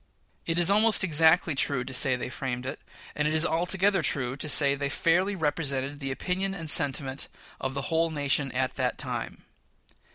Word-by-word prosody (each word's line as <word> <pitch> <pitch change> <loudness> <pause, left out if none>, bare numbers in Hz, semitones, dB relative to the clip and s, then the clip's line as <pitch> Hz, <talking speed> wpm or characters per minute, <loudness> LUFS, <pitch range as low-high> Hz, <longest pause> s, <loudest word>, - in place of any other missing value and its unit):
It 165 0 0
is 175 +2 +5
almost 215 0 +4
exactly 160 -1 +3
true 135 -2 -1
to 130 - -8
say 130 0 +2
they 125 - -5
framed 125 -1 -5
it, 130 - -6 0.3
and 150 0 -1
it 155 - -1
is 160 +2 +5
altogether 180 +3 +1
true 130 -4 0
to 150 +2 -4
say 140 -2 +3
they 140 0 -3
fairly 180 +7 +1
represented 145 -4 -2
the 135 -2 -4
opinion 190 +7 -2
and 165 -4 -7
sentiment 140 -3 0 0.3
of 130 +1 -4
the 140 - -3
whole 165 +1 +2
nation 145 -2 0
at 130 0 -2
that - - -1
time. - - -6
150 Hz, 185 wpm, -27 LUFS, 135-170 Hz, 0.3 s, is